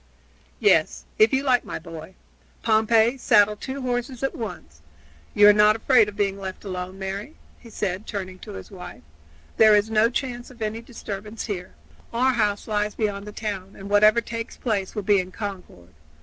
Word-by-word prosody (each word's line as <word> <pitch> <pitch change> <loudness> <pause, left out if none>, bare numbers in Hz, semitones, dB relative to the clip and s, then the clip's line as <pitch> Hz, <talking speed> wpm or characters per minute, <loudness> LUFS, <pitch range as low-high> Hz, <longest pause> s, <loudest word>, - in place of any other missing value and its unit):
"Yes, 420 - +2
if 435 - +6
you 265 0 +1
like, 255 -3 +3
my - - -5
boy. 165 +2 -10 0.5
Pompey, 225 +3 +3
saddle 210 -2 +4
two 265 +5 -6
horses 245 0 -3
at 270 - 0
once. 205 - -8 0.5
You 205 0 +7
are 210 - +9
not 210 +1 +5
afraid 225 -2 +4
of 205 - -11
being 200 -2 -1
left 190 +1 -7
alone, 185 0 -5
Mary?" 195 +9 -5 0.2
he 235 - -14
said, 200 -2 -3
turning 185 -3 -5
to - - -9
his 95 -1 -9
wife. - - -10 0.5
"There 215 -1 +7
is 210 +2 +1
no 220 +1 +4
chance 245 -1 -4
of 250 -2 -16
any 220 +1 -3
disturbance 215 -2 -7
here. 190 -5 -6 0.4
Our 255 +3 +2
house 210 -3 0
lies 210 -1 -1
beyond 205 -2 -2
the - - -6
town, 200 -3 -5
and 195 +1 -9
whatever 215 +3 +5
takes 230 0 -6
place 205 -5 -2
will 210 - -3
be 200 0 +4
in 185 0 -4
Concord. 185 - -8
210 Hz, 180 wpm, -24 LUFS, 195-230 Hz, 0.5 s, are